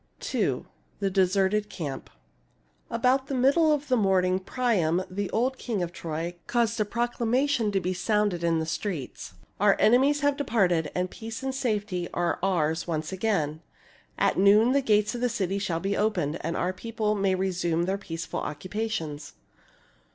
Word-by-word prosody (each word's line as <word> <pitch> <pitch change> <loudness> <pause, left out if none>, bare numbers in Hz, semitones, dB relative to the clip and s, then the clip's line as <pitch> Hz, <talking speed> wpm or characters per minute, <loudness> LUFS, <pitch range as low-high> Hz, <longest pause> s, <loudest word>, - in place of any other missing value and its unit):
ni. - - 0 0.3
THE 195 -1 0
DESERTED 195 +2 +2
CAMP 145 -6 -6 0.8
About 255 +3 +2
the 275 - -2
middle 280 +5 +4
of 295 -1 0
the 255 - +3
morning, 190 -4 +2
Priam, 190 -6 +1
the 200 +1 -2
old 255 +3 0
king 215 -7 -2
of 170 - -4
Troy, 165 0 -4
caused 235 -1 +1
a 215 - +2
proclamation 240 +1 0
to 195 - +1
be 185 0 -2
sounded 205 -1 0
in 165 -1 +2
the 160 - -1
streets: 160 - -4
— - - -28
" - - -39
Our 205 -1 +5
enemies 270 +6 +4
have 285 -1 +2
departed, 190 - +1
and 180 0 -1
peace 225 +2 -7
and 265 0 -2
safety 210 -8 -2
are 175 -1 0
ours 165 -4 0
once 155 -1 -2
again. 170 -6 -1 0.6
At - - +2
noon 210 +5 +6
the 280 +1 +3
gates 210 -3 +2
of 240 - -5
the 250 - +2
city 200 -4 -1
shall 170 -4 -1
be 195 +3 -1
opened, 170 -8 0
and 170 - -2
our 180 +1 0
people 215 +1 -2
may 195 -2 +1
resume 175 -3 0
their 190 +3 -1
peaceful 165 -3 -5
occupations." 165 -4 -4
200 Hz, 170 wpm, -27 LUFS, 175-230 Hz, 0.8 s, noon